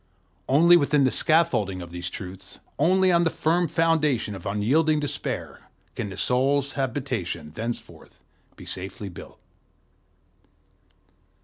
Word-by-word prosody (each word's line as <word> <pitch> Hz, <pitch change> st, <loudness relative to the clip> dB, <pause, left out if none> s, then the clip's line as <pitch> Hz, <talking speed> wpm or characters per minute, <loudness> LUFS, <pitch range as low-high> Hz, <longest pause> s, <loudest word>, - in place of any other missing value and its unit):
Only 170 Hz, +6 st, +6 dB
within 145 Hz, -2 st, +2 dB
the 130 Hz, -, +3 dB
scaffolding 155 Hz, -, +2 dB
of 85 Hz, -1 st, -9 dB
these 90 Hz, +1 st, -5 dB
truths, 95 Hz, -1 st, -9 dB, 0.2 s
only 185 Hz, +4 st, +4 dB
on 170 Hz, 0 st, +4 dB
the 165 Hz, -, +2 dB
firm 170 Hz, +2 st, +1 dB
foundation 155 Hz, -8 st, +1 dB
of 95 Hz, -3 st, -7 dB
unyielding 145 Hz, +10 st, +2 dB
despair, 145 Hz, -1 st, -5 dB, 0.2 s
can 105 Hz, -, -4 dB
the 95 Hz, -, -8 dB
soul's 135 Hz, +4 st, +1 dB
habitation 115 Hz, -, -3 dB
henceforth 115 Hz, +1 st, -7 dB, 0.4 s
be -, -, -12 dB
safely 95 Hz, +2 st, -6 dB
built. 90 Hz, -, -12 dB
135 Hz, 120 wpm, -25 LUFS, 100-160 Hz, 0.4 s, Only